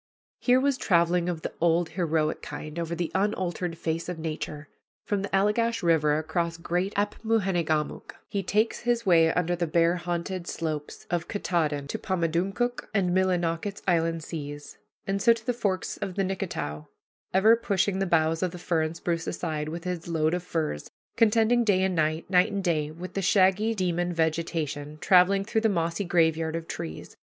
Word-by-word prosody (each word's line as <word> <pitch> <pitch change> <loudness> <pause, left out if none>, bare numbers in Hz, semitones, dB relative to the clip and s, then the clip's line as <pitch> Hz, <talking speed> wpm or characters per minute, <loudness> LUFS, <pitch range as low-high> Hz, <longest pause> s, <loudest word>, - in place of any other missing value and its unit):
Here 250 0 +4
was 275 -1 +1
traveling 175 -1 +2
of 165 -3 -4
the - - -4
old 170 0 +3
heroic 160 -4 0
kind 150 +2 -7
over 170 0 -2
the 170 -1 -2
unaltered 185 -4 -1
face 165 +2 -2
of 180 - -4
nature. 155 -2 -5 0.4
From 205 -2 0
the 200 - -4
Allegash 220 +3 +1
River, 150 -3 +3
across 165 +1 -2
great 175 +3 -1
Apmoojenegamook, 195 -7 0
he 200 - -2
takes 210 +4 +1
his 240 -1 0
way 165 -3 +5
under 175 0 0
the 175 -1 -1
bear 170 +2 +3
haunted 175 +1 -3
slopes 155 -2 -4
of 175 -1 -1
Katahdin 155 -8 -1
to - - -3
Pamadumcook 190 +6 -1
and 185 -3 +2
Millinocket's 185 +1 0
inland 165 -2 +1
seas, 145 -2 -7 0.3
and 195 0 -1
so 230 +2 +6
to 230 -1 -10
the 245 - +1
forks 200 -5 -2
of 185 - -5
the 195 - +1
Nicketow, 175 - -4 0.4
ever 215 +5 +6
pushing 200 -3 0
the 195 - 0
boughs 165 -1 +2
of 185 - +1
the 180 - -9
fir 170 -2 0
and 155 +1 -2
spruce 165 -1 -2
aside, 155 -3 -3
with 165 +1 -6
his 180 -2 -4
load 160 -1 +1
of 180 - 0
furs, 160 - -3 0.3
contending 230 +1 +4
day 195 -4 +3
and 190 -1 +1
night, 155 -1 0
night 180 -1 +3
and 200 -1 -2
day, 155 -4 0
with 170 +4 -8
the 195 - -1
shaggy 195 +4 +3
demon 175 -2 0
vegetation, 160 -3 -2
traveling 195 +3 +4
through 220 +1 0
the 220 - +3
mossy 170 0 -1
graveyard 165 -2 +1
of 165 0 -5
trees. 80 -1 -7
175 Hz, 175 wpm, -27 LUFS, 160-195 Hz, 0.4 s, so